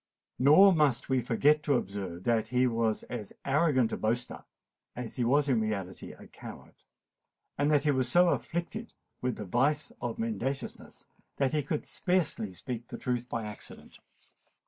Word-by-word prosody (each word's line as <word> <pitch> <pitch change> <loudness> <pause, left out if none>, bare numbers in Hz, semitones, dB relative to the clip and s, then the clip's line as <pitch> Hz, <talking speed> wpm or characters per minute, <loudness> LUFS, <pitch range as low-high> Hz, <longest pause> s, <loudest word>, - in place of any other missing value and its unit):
Nor 155 +9 +7
must 150 -7 +2
we 130 -1 +2
forget 145 +6 +3
to 145 -2 +2
observe 95 -5 -4
that 115 -1 +1
he 125 +2 +2
was 115 -2 0
as 110 -5 -7
arrogant 140 -4 +2
a - - -2
boaster 120 +3 -2 0.5
as 120 -2 -6
he 125 - +1
was 140 +5 +3
in 125 -5 +2
reality 100 -4 -4
a - - -14
coward; - - -11 0.8
and 145 +1 +1
that 145 -2 +3
he 150 - +3
was 130 -2 0
so 175 0 +5
afflicted 175 +8 -3 0.3
with 125 -2 -1
the 105 - -6
vice 145 - +1
of - - -3
mendaciousness, 220 - -4 0.3
he 140 +2 +1
could 145 +2 -3
scarcely 180 - 0
speak 120 +5 -6
the - - -7
truth 125 -1 -2
by 115 -2 -3
accident. 105 -1 -10
130 Hz, 160 wpm, -30 LUFS, 115-150 Hz, 0.8 s, Nor